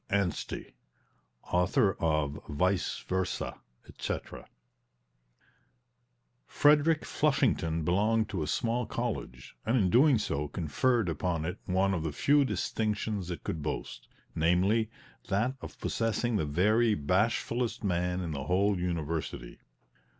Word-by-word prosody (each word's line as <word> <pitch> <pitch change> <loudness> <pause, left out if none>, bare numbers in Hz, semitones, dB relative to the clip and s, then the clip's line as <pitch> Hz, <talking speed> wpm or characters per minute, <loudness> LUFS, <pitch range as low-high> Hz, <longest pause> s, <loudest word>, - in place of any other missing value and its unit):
ANSTEY 100 -4 -2 0.8
Author 90 +2 +3
of 75 -3 0
"Vice 90 +6 0
Versa," 95 -1 -2 0.3
etc. - - -6 2.0
Frederick 150 +2 +4
Flushington 85 - +1
belonged 110 +5 +2
to 95 -6 -3
a 75 - -2
small 115 +8 0
college, 105 - -4
and 115 +4 +2
in 95 -6 +3
doing 135 +3 +6
so 75 -8 -2
conferred 95 - 0
upon 85 0 -1
it 85 - -4
one 95 +1 +2
of 85 - -1
the 80 -1 -2
few 145 - +3
distinctions 105 -6 -2
it 85 - -5
could 80 - -3
boast 75 - -5 0.3
namely, 95 +7 +2 0.4
that 110 +6 +1
of - - -9
possessing 115 +1 0
the 80 -8 0
very 105 +8 +3
bashfulest 110 +9 0
man 90 -1 0
in 85 -3 -3
the 70 -3 -4
whole 95 +3 +2
university. 80 -7 -3
95 Hz, 120 wpm, -30 LUFS, 85-115 Hz, 2.0 s, doing